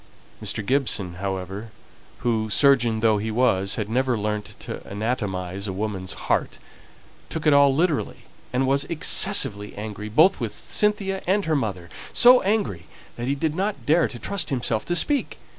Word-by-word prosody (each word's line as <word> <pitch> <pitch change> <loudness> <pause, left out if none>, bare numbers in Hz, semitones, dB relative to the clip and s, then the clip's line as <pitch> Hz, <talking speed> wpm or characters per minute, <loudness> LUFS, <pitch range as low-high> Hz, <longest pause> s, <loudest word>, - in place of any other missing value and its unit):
Mr. 110 - -2
Gibson, 105 -9 0
however, 95 +2 -4 0.5
who, 110 -2 0
surgeon 120 -3 +3
though 110 -2 +3
he 110 +2 -3
was, 110 -5 +1
had 110 -2 -3
never 125 +1 0
learnt 105 0 -4
to - - -7
anatomize 100 -3 -3
a 95 - -3
woman's 95 -2 -4
heart, - - 0 0.7
took 160 -1 -5
it 150 - +5
all 140 -1 +6
literally, 165 -1 -1 0.3
and 130 +1 +1
was 140 +1 +2
excessively 135 - +2
angry 105 0 -6
both 160 - +4
with 115 -5 -3
Cynthia 195 - +1
and 200 +2 +1
her 160 -1 +1
mother; 100 -10 -3 0.3
so 250 +1 +7
angry 120 - -1 0.3
that 120 +1 -5
he 140 - 0
did 155 +1 -1
not 195 +4 -3
dare 160 +2 +3
to 120 - -8
trust 175 +5 -2
himself 120 -4 -1
to 175 - -1
speak. 285 - +1
120 Hz, 160 wpm, -23 LUFS, 105-155 Hz, 0.7 s, so